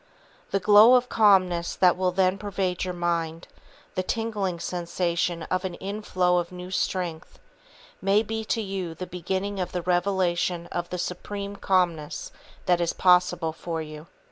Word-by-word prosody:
The 195 - +1
glow 210 +5 +7
of 250 0 +2
calmness 185 -5 +3
that 180 -2 +4
will 185 0 0
then 185 +1 +1
pervade 190 -3 -2
your 180 - -3
mind, 170 -1 -2 0.5
the - - -1
tingling 205 -4 -2
sensation 170 -1 -2
of 185 +3 -2
an 185 -2 -4
inflow 185 -3 0
of 170 0 -4
new 180 0 -8
strength, 175 -4 -3 0.6
may 200 +3 +3
be 220 0 -4
to 225 +1 -1
you 190 -4 -4
the 185 - -5
beginning 190 +3 -3
of 180 -1 -3
the 180 -1 -2
revelation 180 -1 0
of 175 0 -3
the 180 - -4
supreme 200 +3 -5
calmness 175 -6 0 0.3
that 175 -1 +3
is 170 - 0
possible 180 -3 +3
for 165 0 -4
you. 155 0 -8
180 Hz, 155 wpm, -26 LUFS, 175-195 Hz, 0.6 s, glow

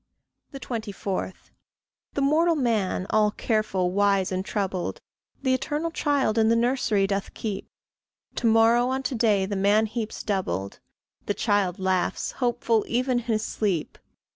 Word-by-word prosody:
24. 205 -6 -4 0.8
The 280 - 0
mortal 325 +4 +3
man, 225 -9 0
all 215 -1 +4
careful, 210 -4 0
wise, 195 -1 +2
and 185 0 -1
troubled, 190 -3 -3 0.4
The 260 -2 +2
eternal 295 +5 -1
child 280 -8 +1
in 220 0 +4
the 230 - +4
nursery 235 -4 +2
doth 195 0 -3
keep. 205 -3 -4 0.7
To 235 - +1
morrow 230 +2 +4
on 265 +1 -1
to 260 - -2
day 215 -5 +2
the 200 +1 -3
man 205 +3 +3
heaps 220 0 -4
doubled; 100 - -2 0.5
The 205 - 0
child 205 -5 +1
laughs, 190 -1 0
hopeful, 240 -3 0
even 250 +1 +1
in 240 - -9
his 220 -2 0
sleep. 190 -8 -2
215 Hz, 140 wpm, -25 LUFS, 195-245 Hz, 0.8 s, all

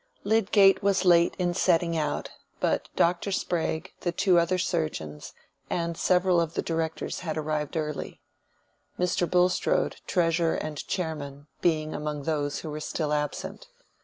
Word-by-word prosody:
Lydgate 200 -2 +4
was 195 -1 +2
late 170 -1 +5
in 175 -1 0
setting 170 -1 +2
out, 155 -2 -2 0.3
but - - 0
Dr. 175 +3 +2
Sprague, 165 -4 -2
the 175 - -1
two 180 0 +3
other 170 +2 +1
surgeons, 155 - -3 0.4
and 170 -1 -1
several 180 0 +3
of 165 -1 -3
the - - -1
directors 165 -1 -2
had 160 -3 -4
arrived 155 0 -2
early; 150 -2 -4 0.8
Mr. 180 -1 +1
Bulstrode, 180 0 +2
treasurer 165 -2 +2
and 155 -1 -5
chairman, 145 -6 -4 0.2
being 155 -2 +1
among 150 -1 -4
those 145 -2 -1
who 155 - -6
were 150 - -4
still 150 0 -2
absent. 150 - -3
165 Hz, 140 wpm, -27 LUFS, 155-180 Hz, 0.8 s, late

